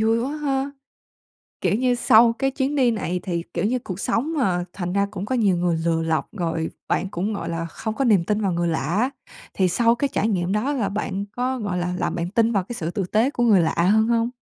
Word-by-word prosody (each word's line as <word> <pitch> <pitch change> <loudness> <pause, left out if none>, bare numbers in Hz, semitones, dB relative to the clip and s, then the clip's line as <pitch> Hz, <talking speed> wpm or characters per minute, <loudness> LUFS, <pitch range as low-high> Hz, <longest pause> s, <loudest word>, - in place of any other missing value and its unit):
vui 225 +1 +3
quá 275 +6 -2
ha. 275 -2 -1 0.9
Kiểu - - +2
như, 250 +1 +2
sau 230 0 +5
cái 270 0 +1
chuyến 270 +2 -1
đi 255 -4 +3
này 180 -5 -2
thì, 170 -3 -2
kiểu 170 +3 -1
như, 250 +4 +1
cuộc 190 -5 -7
sống 255 +9 0
mà, 180 -8 +1
thành 180 -2 -4
ra 200 0 +2
cũng 195 -1 -5
có 260 +4 -1
nhiều 205 -6 +3
người 170 -1 +1
lừa 165 -1 +1
lọc 160 -2 0
rồi 165 -2 -1 0.2
bạn 190 - 0
cũng, 200 +5 -2
gọi 200 - -4
là, 165 0 -3
không 215 +6 -5
có 275 - 0
niềm 205 -8 +4
tin 210 +3 -1
vào 195 -3 +1
người 170 0 0
lạ 160 -1 0 0.2
á, 250 +3 +2 0.4
thì 190 - +2
sau 230 +5 +3
cái 280 - 0
trải 215 - +1
nghiệm 185 -4 0
đó 225 +8 0
là 220 -8 -1
bạn 200 -1 -3
có, 250 +3 -2
gọi 200 -4 -2
là, 180 0 -1
làm - - -1
bạn 170 0 -2
tin 225 +3 +2
vào 200 -4 +1
cái 240 - -7
sự 170 -6 -3
tử 200 +1 -2
tế 225 +5 +3
của 240 - -1
người 210 -7 +5
lạ 160 - +1 0.2
hơn 220 0 +3
hông? 230 0 +2
210 Hz, 255 wpm, -23 LUFS, 180-240 Hz, 0.9 s, sau